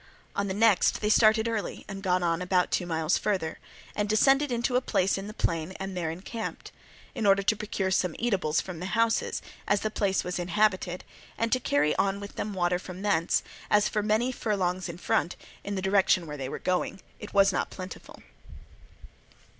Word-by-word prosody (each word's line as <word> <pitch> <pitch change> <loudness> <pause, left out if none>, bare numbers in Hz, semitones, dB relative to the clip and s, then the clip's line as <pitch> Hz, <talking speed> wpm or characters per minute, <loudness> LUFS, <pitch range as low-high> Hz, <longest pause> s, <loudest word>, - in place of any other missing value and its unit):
On 200 0 0
the 190 - -2
next 220 -2 +4
they 210 0 +1
started 220 0 +5
early 225 -3 -3
and 195 -1 -7
got 180 -2 +1
on 170 0 +1
about 180 0 +1
two 180 - 0
miles 160 0 +1
further, 185 -6 -1 0.4
and 210 0 -1
descended 270 +6 +4
into 240 +1 0
a 250 - +4
place 195 -6 +1
in 195 +1 -5
the - - -6
plain 170 -3 -2
and 190 0 -5
there 170 -3 -2
encamped, 195 +7 -6 0.4
in 215 - -1
order 195 0 +5
to 215 - +2
procure 200 -2 -2
some 180 -3 +1
eatables 180 -11 +1
from 180 -3 -7
the 180 - -4
houses, 230 0 +1 0.2
as 205 - +2
the 215 - -2
place 195 -3 0
was 180 0 -3
inhabited, 185 0 0 0.3
and 230 0 0
to 255 - +3
carry 150 - +1
on 195 0 +1
with 200 0 -8
them 205 -1 -4
water 175 -1 +1
from 185 +1 -8
thence, 180 -5 +2 0.3
as 210 0 +4
for 210 - -1
many 220 +4 +1
furlongs 185 -6 -1
in 170 - -6
front, 175 0 0 0.3
in 200 - -4
the 190 - -3
direction 190 -2 +3
in 160 - -10
which 150 -1 -6
they 130 -1 -4
were - - -4
going, 185 +1 -1 0.2
it 210 -1 -9
was 195 0 +5
not - - -1
plentiful. 185 0 -9
195 Hz, 200 wpm, -28 LUFS, 180-215 Hz, 0.4 s, started